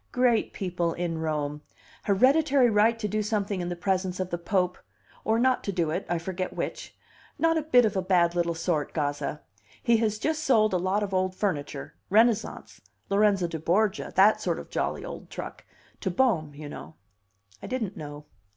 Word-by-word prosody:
Great 245 -3 +2
people 175 -3 -2
in 170 -2 -3
Rome. 150 -2 -2 0.4
Hereditary 260 +4 +4
right 220 +2 +4
to 220 -2 -2
do 215 +1 -1
something 205 -2 -1
in 175 - -3
the 175 - -3
presence 185 0 -1
of 185 -1 -3
the 175 - -1
Pope 180 0 0 0.4
or 220 +1 +2
not 255 +2 +2
to 200 - -1
do 170 -5 0
it, 180 +5 -3
I 175 - +1
forget 185 +2 -4
which. - - -5 0.4
Not 330 0 +3
a 320 - +1
bit 250 -6 +4
of 210 -1 -1
a 190 - +1
bad 175 -2 +3
little 170 -1 0
sort, 165 -3 -1
Gazza. 145 0 -2 0.4
He 235 -1 +4
has 215 -2 0
just 310 +6 -1
sold 220 -8 +3
a - - +3
lot 190 +4 0
of 195 -1 -4
old 185 0 0
furniture 150 -7 -3 0.2
Renaissance 225 +2 +1 0.3
Lorenzo 200 -2 +3
du 165 -1 -5
Borgia 200 +6 +1
that 200 +3 +5
sort - - -1
of - - -9
jolly - - -2
old - - -8
truck - - -8 0.3
to 190 - -2
Bohm, 175 - +1
you 150 0 -8
know." 80 - -9 0.7
I - - -7
didn't 225 -6 -3
know. 145 -1 -8
190 Hz, 190 wpm, -27 LUFS, 170-220 Hz, 0.7 s, that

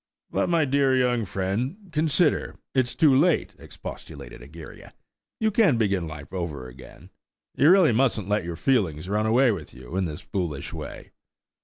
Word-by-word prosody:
"But - - 0
my 165 -3 +3
dear 135 -1 +2
young 125 -3 +1
friend, 100 - -2
consider–it's 150 -5 0
too 145 -4 +5
late," 165 +7 +2
expostulated - - -10
Egeria. - - -12 0.4
"You 220 -2 +1
can't 195 - +3
begin 100 -6 0
life 75 0 -10
over 75 -8 -4
again. 65 +1 -14 0.4
You 145 - +4
really 180 -5 +6
mustn't 115 -4 +1
let 105 -1 0
your 85 0 -5
feelings 90 - 0
run 105 +2 0
away 120 +3 +4
with 85 -10 -6
you 65 +6 -10
in 95 -1 +1
this 75 -3 -5
foolish 85 -8 -4
way. - - -8
110 Hz, 155 wpm, -25 LUFS, 85-140 Hz, 0.4 s, really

